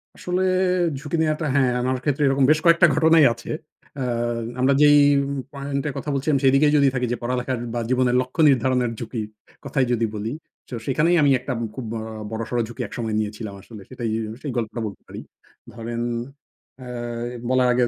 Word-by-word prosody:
আসলে, 180 +1 -2 0.6
ঝুঁকি 150 +3 -3
নেওয়াটা 155 0 0
হ্যাঁ, 130 -3 +3
আমার 130 +1 0
ক্ষেত্রে 145 0 0
এরকম 135 0 +2
বেশ 155 - +3
কয়েকটা 170 +1 +6
ঘটনাই 160 0 +5
আছে। 115 - -9 0.5
আ - - 0 0.6
আমরা 135 +2 +4
যেই 145 0 +7 0.5
পয়েন্ট 140 0 -3
এ - - -3
কথা 145 - -5
বলছিলাম 140 +1 +1
সেইদিকেই 135 +3 +4
যদি 140 -1 +4
থাকি 125 -1 0
যে, 120 - -1
পড়ালেখার 125 0 -2
বা 120 - -1
জীবনের 125 -1 +2
লক্ষ্য 130 +6 -3
নির্ধারণের 125 -2 +2
ঝুঁকির 110 -2 -4 0.4
কথাই 135 -3 +1
যদি 115 -1 +1
বলি, 110 +5 -3 0.4
শো 125 - -5
সেখানেই 165 +6 +2
আমি 140 -1 +4
একটা 130 - -5
আব - - -4 0.2
খুব 130 -3 -5
বড়, 110 -1 -4 0.3
বড়সড় 115 +2 -2
ঝুঁকি 120 - -7
এক - - -14
সময় 110 -2 -2
নিয়েছিলাম 105 0 -4
আসলে। 105 0 -12
সেটাই, 120 -3 -4 0.2
উ - - -6
সেই 145 - -4
গল্পটা 115 0 -3
বলতে 100 - -10
পারি। - - -8 0.5
ধরেন, 115 +1 -5 0.8
আ - - -9 0.6
বলার 130 -1 +3
আগে 125 0 +2
130 Hz, 180 wpm, -23 LUFS, 120-145 Hz, 0.8 s, যেই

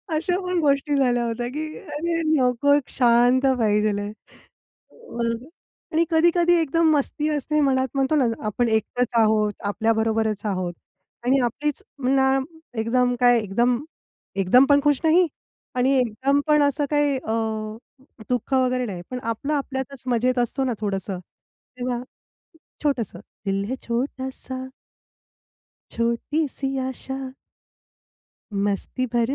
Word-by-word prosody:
अशा 355 +3 0
पण 360 -1 0
गोष्टी 285 0 +2
झाल्या 245 -3 +2
होत्या 235 +1 -2
की 310 +1 -3
अरे 330 +2 -2
नको, 255 +2 +3
एक 290 -3 +1
शांत 245 +2 +4
पाहिजे 210 -1 +2
आहे. 205 +1 -4 0.8
मग 235 - -4 0.5
आणि 335 +1 +3
कधी-कधी 345 +2 +4
एकदम 325 +2 +2
मस्ती 295 +2 0
असते 300 +1 0
मनात 265 -1 +2
म्हणतो 270 +3 +2
ना 275 - +3 0.2
आपण 230 +3 0
एकटंच 240 +2 0
आहोत. 215 -1 +3
आपल्याबरोबरच 220 0 0
आहोत 185 -3 -2 0.5
आणि 265 +2 +4
आपलीच 290 +5 -2 0.2
ना 265 0 +3 0.5
एकदम 245 +2 +2
काय 245 -1 +5
एकदम 235 +5 +1 0.7
एकदम 250 +9 +6
पण 285 0 +6
खुश 290 -2 +3
नाही 335 +2 +5 0.5
आणि 255 +2 +2
एकदम 260 +4 +1
पण 300 -1 +5
असं 285 +1 +1
काही 290 -2 +2
अ, 220 -4 -5 1.0
दुःख 250 +2 -1
वगैरे 255 -1 +2
नाही. 185 -5 -5
पण 250 - -3
आपलं 230 +6 -2
आपल्यातच 270 -2 -3
मजेत 250 +1 +1
असतो 245 +3 0
ना 250 -2 0
थोडंसं 195 -2 -2 0.6
तेव्हा, 245 -1 -2 0.8
छोटंसं, 270 -8 -1 0.3
दिल 195 0 0
है 260 - -1
छोटासा 260 +1 -3 1.2
छोटी 235 +7 0
सी 270 0 -3
आशा 265 0 -6 1.2
मस्ती 200 +5 -1
भरी 240 +3 +2
255 Hz, 125 wpm, -23 LUFS, 230-285 Hz, 1.2 s, एकदम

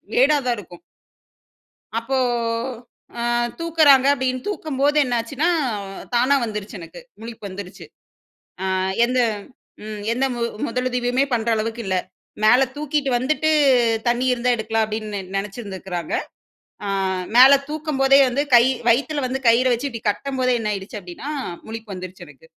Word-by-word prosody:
மேடா 290 +4 +5
தான் 245 -1 +1
இருக்கும். 175 -3 -13 1.1
அப்போ 250 +4 -1 1.0
ஆ - - -3 0.4
தூக்குறாங்க 310 -5 +5
அப்டின்னு 255 -2 -2
தூக்கும்போது 295 -6 -1
என்னாச்சுன்னா, 250 +5 -1 0.7
தானா 255 +4 +3
வந்துருச்சு 210 -2 -6
எனக்கு. 170 - -11 0.2
முழிப்பு 225 -2 -8
வந்துருச்சு. 185 0 -9 0.8
ஆ - - -1 0.4
எந்த 255 +1 0 0.6
ம் 215 -1 -6
எந்த 255 +3 0 0.4
முதலுதவியுமே 250 +2 0
பண்ற 230 -1 -1
அளவுக்கு 225 +2 -3
இல்ல. 190 - 0 0.5
மேல 245 +5 +6
தூக்கிட்டு 295 -1 -1
வந்துட்டு 310 +5 0 0.6
தண்ணி 240 +1 +1
இருந்தா 250 0 -1
எடுக்கலாம், 220 0 0
அப்டின்னு 215 -1 -4 0.2
நெனைச்சிருந்துருக்கிறாங்க. 195 -4 -5 0.7
ஆ - - -3 0.5
மேல 265 +2 +9 0.2
தூக்கும்போதே 285 -3 +2
வந்து, 275 +4 0
கை 235 - +8 0.3
வயித்துல 285 +4 +1
வந்து, 265 +1 -3
கயிற 235 +3 +5
வச்சு 265 +4 -2
இப்டி 230 -2 -7
கட்டும்போதே 255 +2 0
என்ன 210 -1 -1
ஆயிடுச்சு 200 +1 -6
அப்டின்னா, 180 +10 -8 0.4
முழிப்பு 220 -2 -7
வந்துருச்சு 185 -1 -8
எனக்கு. 145 +1 -17
240 Hz, 125 wpm, -21 LUFS, 215-270 Hz, 1.1 s, மேல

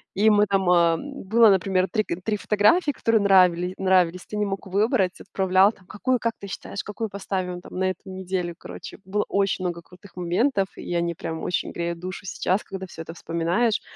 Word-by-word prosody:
И 215 +3 +4
мы 210 0 +5
там 195 -2 +1
э 170 -2 +4 0.3
было, 225 +2 +6
например, 190 0 +2
3 215 - +1
г 170 +1 -4
3 215 -2 0
фотографии, 255 - +3
которые 225 -5 +1
нравили 180 -2 +4
нравились. 180 -2 +2
Ты 210 - -5
не 210 - +1
мог 195 0 -4
выбрать, 195 -1 +1
отправлял 190 +1 +3
там: 185 -4 -23
"Какую, 250 +4 -1
как 230 -1 -1
ты 200 - -7
считаешь, 195 0 -6
какую 215 +1 -4
поставим 185 -2 -4
там - - -12
на 190 - +1
эту - - -10
неделю?" 185 -2 -3
Короче, - - -10
было 205 +2 -1
очень 195 -2 0
много 170 -1 -3
крутых 185 +3 -17
моментов, 190 +4 +1
и - - -5
они 170 -1 0
прям 160 0 -5
очень 180 - -1
греют 170 0 -3
душу 185 +2 -7
сейчас, 185 +2 -1
когда 190 -1 -7
всё 165 -2 -10
это 165 0 -8
вспоминаешь. 170 +8 0
190 Hz, 200 wpm, -24 LUFS, 180-205 Hz, 0.3 s, было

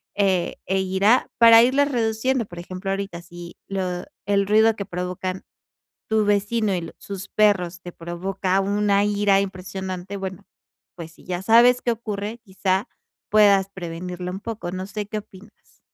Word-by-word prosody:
eh, 190 -3 +1
e 190 0 0
irá 190 +5 +2
para 230 -1 +9
irles 280 +4 +3
reduciendo. 235 +1 0
Por 175 - -12
ejemplo, 185 +2 -6
ahorita 195 -3 -4
si 175 0 -11
lo 185 -2 -3 0.2
el 200 0 +1
ruido 220 +1 +4
que 200 - -5
provocan 185 0 -4 0.7
tu 220 -1 +2
vecino 205 +1 +1
y 170 -2 -5
sus 195 -1 -8
perros 185 -5 +2
te 175 - -7
provoca 185 +3 -2
una 200 0 +2
ira 205 -1 +3
impresionante, 190 0 -5
bueno, 190 0 -7 0.5
pues 165 -2 -9
si - - -20
ya 180 -1 -3
sabes 240 +3 +6
qué 240 - +2
ocurre, 220 -1 -4
quizá, 190 -1 -1 0.4
puedas 200 -2 +5
prevenirlo 180 -1 -6
un 190 - -5
poco. 215 -5 -5
No 185 +1 -4
sé, 210 0 -4
¿qué 215 0 -3
opinas? 205 +1 -18
195 Hz, 155 wpm, -23 LUFS, 185-210 Hz, 0.7 s, para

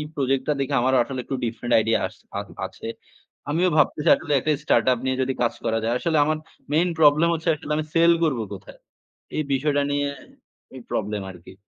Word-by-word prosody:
Project 135 -1 0
টা 150 - +3
দেখে, 140 +1 -2
আমারও 130 +1 +3
আসলে 130 +1 -6
একটু 135 - -4
ডিফারেন্ট 120 +1 -3
আইডিয়া 110 +1 +2
আস - - -17 0.2
আ - - 0 0.3
আছে। - - -8 0.6
আমিও 170 +5 +2
ভাবতেছি 150 0 +2
আসলে 160 -2 -5
একটা 145 +4 -1
স্টার্ট - - +3
আপ 125 - 0
নিয়ে 130 0 0
যদি 135 - 0
কাজ 120 - +1
করা 115 0 +1
যায়। 115 +2 0
আসলে 165 +3 0
আমার 155 +1 0 0.3
মেইন 170 +4 +3
প্রবলেম 155 +1 +5
হচ্ছে, 160 +1 -3
আসলে 150 0 -10
আমি 155 - -1
সেল 170 +1 +6
করবো 135 -8 0
কোথায়? 95 0 -12 0.6
এই 155 - +1
বিষয়টা 145 +2 +1
নিয়ে 145 0 0 0.7
এই 130 - -9
প্রবলেম 105 -1 -2
আরকি। 90 0 -14
135 Hz, 195 wpm, -23 LUFS, 120-155 Hz, 0.7 s, সেল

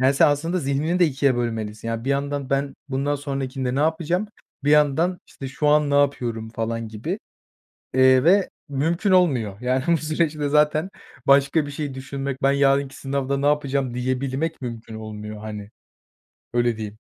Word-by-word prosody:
Yani, 130 +2 +4
sen 140 - +5
aslında 165 +5 0
zihnini 150 +4 0
de 175 - +5
ikiye 135 -2 +1
bölmelisin. 115 -2 -3
Yani, 115 0 -3
bir 135 - 0
yandan 140 -1 -2
ben 140 0 0
bundan 140 +2 0
sonrakinde 135 -2 -3
ne 140 - +1
yapacağım? 165 +6 0 0.4
Bir 145 - +3
yandan 150 +4 +3
işte 135 - -8
şu 150 +3 -1
an 150 -1 +4
ne - - +1
yapıyorum 120 -6 0
falan 115 0 -3
gibi, 110 -1 -4 0.8
eee, 130 0 +5
ve 190 +3 +4 0.2
mümkün 165 +8 0
olmuyor. 125 - +2
Yani 130 +2 0
bu 170 - +5
süreçte 155 -2 -1
zaten 150 +4 +2 0.4
başka 140 +2 +4
bir - - -6
şey 145 -2 -4
düşünmek, 135 0 -5
ben 135 0 +4
yarınki 140 -1 +2
sınavda 140 0 -2
ne 140 +1 -1
yapacağım 140 -4 +1
diyebilmek 130 +5 -2
mümkün 115 -2 -6
olmuyor 110 -1 -7
hani. 105 -1 -7 0.8
Öyle 120 -2 +1
diyeyim. 105 -1 -6
140 Hz, 165 wpm, -23 LUFS, 125-150 Hz, 0.8 s, sen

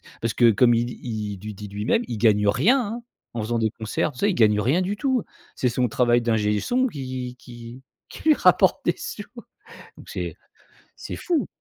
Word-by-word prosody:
que - - -19
parce 115 -1 -2
que 120 -2 +5
comme 120 +3 +4
il 120 +1 +1
dit 120 - -8
il 105 -4 -4
du 105 +2 -7
dit 105 +1 -9
lui-même, 105 - 0
il 115 - -5
gagne 105 -2 +3
rien, 200 - +4
hein. 235 +1 -4 0.3
En 115 - -2
faisant 115 +2 -1
des 110 -1 +1
concerts, 110 +7 -2
tu 125 - -11
sais, 205 - +3
il - - -1
gagne 105 -2 +4
rien 135 - +2
du 195 +3 -2
tout. 260 -1 0 0.3
C'est 125 - 0
son 125 +1 +1
travail 120 +1 +2
d'ingé 105 -3 +1
son 255 - +1
qui 130 - -5
qui 120 +1 -11 0.3
qui - - -11
lui - - +7
rapporte - - +4
des - - +2
sous. - - -6 0.7
Donc - - -14
c'est - - -5 0.6
c'est - - -7
fou. 320 - -1
120 Hz, 210 wpm, -24 LUFS, 110-155 Hz, 0.7 s, lui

